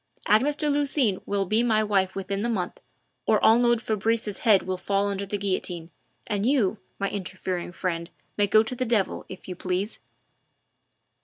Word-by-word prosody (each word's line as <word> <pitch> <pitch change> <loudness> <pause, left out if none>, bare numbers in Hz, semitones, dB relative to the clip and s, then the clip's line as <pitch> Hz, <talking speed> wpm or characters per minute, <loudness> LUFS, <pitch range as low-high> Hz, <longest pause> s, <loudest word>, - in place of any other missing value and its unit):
Agnes 260 +8 +3
de 300 - 0
Lucines 280 -8 +1
will 200 -1 0
be 215 +5 +2
my 220 -3 +3
wife 195 -3 +1
within 195 +1 -3
the 235 - 0
month, 185 -6 -2 0.5
or - - +4
Arnould 235 +1 +4
Fabrice's 220 -1 -1
head 210 -5 +4
will 185 0 -2
fall 200 +2 0
under 200 0 -3
the 205 - -2
guillotine, 180 -4 -3 0.3
and 205 -1 -1
you, 220 -5 +2 0.2
my 200 - -1
interfering 185 -2 -4
friend, 170 -2 -3 0.3
may 205 -1 +2
go 215 +2 +5
to 225 - -5
the 255 +1 -2
devil, 225 -5 0
if 185 - -10
you 180 - -5
please." 185 +4 -3
205 Hz, 170 wpm, -26 LUFS, 190-225 Hz, 0.5 s, go